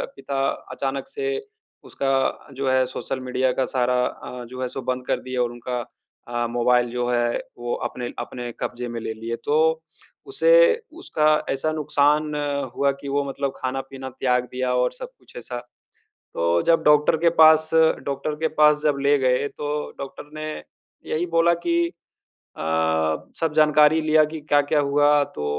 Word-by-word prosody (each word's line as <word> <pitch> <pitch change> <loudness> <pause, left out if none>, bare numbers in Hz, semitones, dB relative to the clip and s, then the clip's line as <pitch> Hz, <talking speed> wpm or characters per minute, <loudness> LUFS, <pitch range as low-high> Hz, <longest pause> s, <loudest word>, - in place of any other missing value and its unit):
पिता 135 0 -2 0.2
अचानक 135 0 -3
से 420 +8 -3 0.4
उसका 135 - -3 0.4
जो 135 +1 -3
है 130 0 +3
सोशल 130 +1 -4
मीडिया 130 0 0
का 130 - 0
सारा 125 -1 0
अ, 125 -1 -8
जो 130 +2 -8
है 130 - -1
सो 135 - -6
बंद 125 0 -3
कर - - 0
दिया 130 -1 -3
और 120 - -2
उनका 120 +1 -4 0.5
अ, 120 0 -1
मोबाइल 120 +1 +2
जो 120 0 -2
है 120 -1 +1 0.2
वो 120 0 -3 0.2
अपने 125 0 -6
अपने 120 -1 -6
कब्जे 125 0 -4
में 120 0 -4
ले 110 - -4
लिए। 115 +1 -5
तो 150 - +2 0.7
उसे 420 +5 +3 0.5
उसका 155 - +1 0.2
ऐसा 135 +4 0
नुकसान 150 0 +1 0.4
हुआ 140 0 +2
कि 140 - -7
वो 140 +1 +1
मतलब 140 0 -3
खाना-पीना 135 0 -5
त्याग 125 -1 0
दिया 125 0 -1
और 125 0 +2
सब - - -8
कुछ - - -20
ऐसा। 125 - -6 0.8
तो 85 +1 +1
जब 165 -1 +4
डॉक्टर 150 +1 +4
के 170 +2 +3
पास 155 0 +7 0.4
डॉक्टर 140 +2 -3
के 160 - +1
पास 150 0 +5
जब 150 -2 +2
ले 140 +1 +4
गए 130 +1 +2
तो 145 +1 -6 0.3
डॉक्टर 140 +1 -8
ने 155 0 -5 0.6
यही 160 +3 0
बोला 170 +1 +5
कि 340 0 +2 0.8
अ, - - -6 0.8
सब 160 -2 0
जानकारी 150 0 +5
लिया 155 0 +4
कि 155 +1 -7
क्या-क्या 145 0 +2
हुआ, 145 +1 +3
तो 75 - -6
135 Hz, 165 wpm, -23 LUFS, 125-150 Hz, 0.8 s, पास